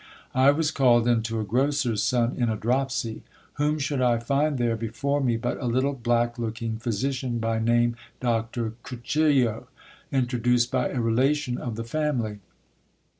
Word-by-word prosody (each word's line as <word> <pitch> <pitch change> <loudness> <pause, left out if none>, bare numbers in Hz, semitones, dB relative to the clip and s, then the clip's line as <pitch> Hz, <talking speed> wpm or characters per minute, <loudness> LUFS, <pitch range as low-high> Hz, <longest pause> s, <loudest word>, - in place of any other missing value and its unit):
I 130 +2 +5
was. 155 +2 +2
called 120 -5 +4
in 120 -2 +3
to 115 0 -2
a - - -1
grocers 125 0 0
son 120 -1 +1
in 120 -2 0
a 110 - 0
dropsy. 120 0 -1 0.4
Whom 150 +1 +2
should 140 -2 -1
I 120 -2 +3
find 140 +5 0
th 120 -1 +1
;re - - 0
before 115 +6 -2
me 120 -4 +1
but 120 +2 -3
a 125 - -2
little 130 +4 +1
black 120 -1 0
looking 115 -1 -3
physician, 125 +2 -2
by 115 0 -1
name 120 +1 +2 0.2
Doctor 115 -1 -1
Cuchillo, 130 -2 +1 0.4
int 130 -2 0
reduced 120 0 +2
by 130 -1 +1
a 130 - -3
relation 125 +3 +1
of 120 -3 -4
the 115 - -4
family. 120 -5 -2
120 Hz, 170 wpm, -25 LUFS, 115-135 Hz, 0.4 s, I